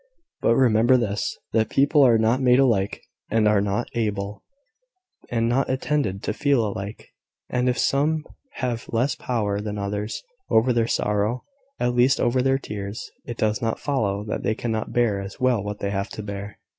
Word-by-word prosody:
But 115 Hz, -, +3 dB
remember 120 Hz, 0 st, +4 dB
this, 105 Hz, -4 st, -2 dB, 0.2 s
that 110 Hz, -1 st, +2 dB
people 145 Hz, +2 st, +4 dB
are 120 Hz, -3 st, +6 dB
not 115 Hz, +4 st, +2 dB
made 125 Hz, -1 st, +5 dB
alike, 115 Hz, -8 st, +2 dB, 0.3 s
and 110 Hz, -1 st, +3 dB
are 105 Hz, -1 st, +4 dB
not 100 Hz, +4 st, -1 dB
able, 105 Hz, -3 st, -2 dB, 0.9 s
and 115 Hz, -1 st, +1 dB
not 125 Hz, +3 st, +1 dB
intended 130 Hz, -7 st, -1 dB
to -, -, -1 dB
feel 140 Hz, -6 st, +2 dB
alike; 100 Hz, 0 st, -6 dB, 0.4 s
and 125 Hz, 0 st, +1 dB
if 125 Hz, -, 0 dB
some 150 Hz, +3 st, +1 dB, 0.3 s
have 120 Hz, -3 st, -3 dB
less 125 Hz, +4 st, +1 dB
power 105 Hz, -5 st, -2 dB
than 105 Hz, 0 st, -4 dB
others 105 Hz, +1 st, -3 dB, 0.3 s
over 120 Hz, +3 st, +4 dB
their 115 Hz, -1 st, +2 dB
sorrow, 105 Hz, +4 st, 0 dB, 0.4 s
at 125 Hz, 0 st, +1 dB
least 125 Hz, +3 st, +3 dB
over 125 Hz, +1 st, +2 dB
their 135 Hz, +1 st, +2 dB
tears, 105 Hz, -4 st, -6 dB
it 120 Hz, -, -6 dB
does 110 Hz, 0 st, 0 dB
not 115 Hz, -1 st, -1 dB
follow 105 Hz, -8 st, -1 dB
that 105 Hz, -, -3 dB
they 110 Hz, -, 0 dB
cannot 110 Hz, -2 st, -3 dB
bear 110 Hz, -5 st, +1 dB
as 100 Hz, 0 st, -8 dB
well 125 Hz, -5 st, +2 dB
what 105 Hz, 0 st, -4 dB
they 100 Hz, -, -3 dB
have 100 Hz, +1 st, -2 dB
to 110 Hz, -, -4 dB
bear. 100 Hz, 0 st, -6 dB
115 Hz, 180 wpm, -24 LUFS, 105-125 Hz, 0.9 s, are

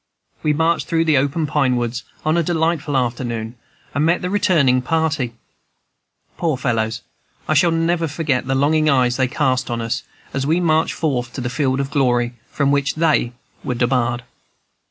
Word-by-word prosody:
We 150 Hz, -, +1 dB
marched 160 Hz, +2 st, +1 dB
through 165 Hz, 0 st, +1 dB
the 155 Hz, -3 st, +3 dB
open 145 Hz, +4 st, 0 dB
pine 140 Hz, -3 st, +1 dB
woods, 120 Hz, 0 st, -2 dB, 0.2 s
on 155 Hz, +1 st, +2 dB
a 170 Hz, -, +3 dB
delightful 160 Hz, -3 st, 0 dB
afternoon, 120 Hz, -2 st, -2 dB, 0.4 s
and 145 Hz, -, +1 dB
met 170 Hz, +3 st, +2 dB
the 180 Hz, -, -2 dB
returning 155 Hz, -11 st, +3 dB
party. 155 Hz, -4 st, -1 dB, 1.0 s
Poor 160 Hz, -5 st, 0 dB
fellows! 115 Hz, -3 st, -1 dB, 0.4 s
I -, -, +2 dB, 0.2 s
never 165 Hz, 0 st, +1 dB
shall 145 Hz, -, -9 dB
forget 140 Hz, -6 st, 0 dB
the 135 Hz, -, +1 dB
longing 155 Hz, +3 st, +3 dB
eyes 125 Hz, -3 st, +2 dB
they 130 Hz, -1 st, +2 dB
cast 130 Hz, -1 st, 0 dB
on 120 Hz, -1 st, -2 dB
us, 115 Hz, +1 st, -2 dB, 0.3 s
as 135 Hz, 0 st, -1 dB
we 165 Hz, +3 st, +2 dB
marched 160 Hz, -2 st, +1 dB
forth 125 Hz, -7 st, -1 dB
to 130 Hz, -, -5 dB
the 120 Hz, 0 st, -3 dB
field 135 Hz, -2 st, 0 dB
of 140 Hz, 0 st, -2 dB
glory, 120 Hz, -4 st, +1 dB, 0.2 s
from 140 Hz, -1 st, +1 dB
which 140 Hz, 0 st, +1 dB
they 155 Hz, -7 st, +2 dB, 0.3 s
were 125 Hz, -, -2 dB
debarred. 120 Hz, -1 st, 0 dB
140 Hz, 175 wpm, -20 LUFS, 125-160 Hz, 1.0 s, the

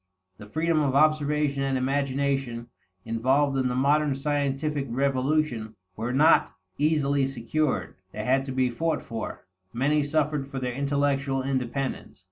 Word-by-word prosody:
The 105 Hz, -, -10 dB
freedom 160 Hz, +4 st, +1 dB
of 135 Hz, -2 st, 0 dB
observation 150 Hz, -1 st, +2 dB
and 135 Hz, -1 st, 0 dB
imagination 135 Hz, -2 st, -1 dB, 0.4 s
involved 130 Hz, +5 st, +1 dB
in 130 Hz, -1 st, +1 dB
the 125 Hz, -, -1 dB
modern 145 Hz, +2 st, +2 dB
scientific 145 Hz, 0 st, -1 dB
revolution 130 Hz, -3 st, 0 dB, 0.2 s
were 115 Hz, +4 st, -3 dB
not 150 Hz, +5 st, +4 dB, 0.2 s
easily 140 Hz, -2 st, +2 dB
secured; 130 Hz, -, -1 dB, 0.2 s
they 105 Hz, -, -5 dB
had 130 Hz, +3 st, +2 dB
to 135 Hz, -, -5 dB
be 130 Hz, -1 st, +1 dB
fought 160 Hz, +5 st, -1 dB
for; 115 Hz, -2 st, -6 dB, 0.3 s
many 145 Hz, +5 st, +2 dB
suffered 145 Hz, -1 st, 0 dB
for 135 Hz, -, -7 dB
their 125 Hz, -1 st, -2 dB
intellectual 140 Hz, 0 st, 0 dB
independence. 135 Hz, 0 st, -3 dB
135 Hz, 135 wpm, -26 LUFS, 130-145 Hz, 0.4 s, not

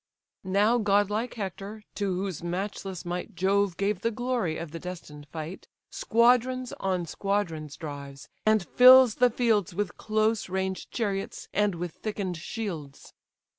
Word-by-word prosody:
Now 210 Hz, +5 st, +3 dB
godlike 205 Hz, +2 st, +1 dB
Hector, 205 Hz, +1 st, -6 dB
to 200 Hz, -1 st, -1 dB
whose 185 Hz, -2 st, -3 dB
matchless 185 Hz, +1 st, -4 dB
might 180 Hz, +3 st, -4 dB
Jove 195 Hz, 0 st, +1 dB
gave 200 Hz, -1 st, 0 dB
the 230 Hz, -, +1 dB
glory 235 Hz, -8 st, -1 dB
of 170 Hz, -3 st, -6 dB
the 165 Hz, -, -6 dB
destined 160 Hz, -5 st, -8 dB
fight, 160 Hz, +5 st, -7 dB, 0.2 s
Squadrons 250 Hz, +2 st, +2 dB
on 185 Hz, -2 st, -1 dB
squadrons 165 Hz, -6 st, -2 dB
drives, 140 Hz, -2 st, -8 dB, 0.2 s
and 215 Hz, -4 st, +3 dB
fills 255 Hz, -1 st, +8 dB
the 250 Hz, -, +7 dB
fields 220 Hz, -7 st, +1 dB
With 205 Hz, -1 st, -2 dB
close 215 Hz, -1 st, 0 dB
ranged 190 Hz, 0 st, -2 dB
chariots, 200 Hz, -4 st, -3 dB
and 205 Hz, -2 st, +2 dB
with 175 Hz, 0 st, -4 dB
thicken'd 195 Hz, -2 st, -4 dB
shields. 165 Hz, -, -6 dB
195 Hz, 135 wpm, -27 LUFS, 175-215 Hz, 0.2 s, fills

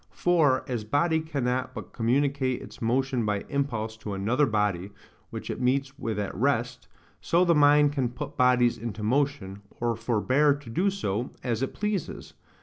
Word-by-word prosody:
For, 155 Hz, -7 st, +2 dB
as 120 Hz, -4 st, -3 dB
body 160 Hz, +9 st, +1 dB
cannot 130 Hz, -5 st, -2 dB
but 110 Hz, -5 st, -8 dB
communicate 130 Hz, +2 st, +1 dB
its -, -, -12 dB
motion 125 Hz, +1 st, 0 dB
by 105 Hz, -2 st, -1 dB
impulse 115 Hz, -6 st, -2 dB
to 105 Hz, -2 st, -5 dB
another 120 Hz, +9 st, +1 dB
body, 105 Hz, -4 st, 0 dB, 0.4 s
which -, -, -6 dB
it -, -, -5 dB
meets 135 Hz, +2 st, 0 dB
with 110 Hz, -2 st, -3 dB
at 105 Hz, -1 st, -3 dB
rest, 125 Hz, +1 st, -1 dB, 0.3 s
so 175 Hz, +2 st, +3 dB
the 170 Hz, -, +4 dB
mind 145 Hz, -1 st, +5 dB
can 130 Hz, -4 st, 0 dB
put 145 Hz, +4 st, -7 dB
bodies 125 Hz, -2 st, +3 dB
into 110 Hz, -1 st, -5 dB
motion, 115 Hz, -5 st, -1 dB, 0.2 s
or 120 Hz, -1 st, 0 dB
forbear 130 Hz, +6 st, +2 dB
to 145 Hz, -4 st, -12 dB
do 185 Hz, -, +2 dB
so, 120 Hz, -, -2 dB
as 120 Hz, -2 st, -1 dB
it 135 Hz, -, -3 dB
pleases. 210 Hz, -5 st, -3 dB
125 Hz, 165 wpm, -27 LUFS, 115-145 Hz, 0.4 s, mind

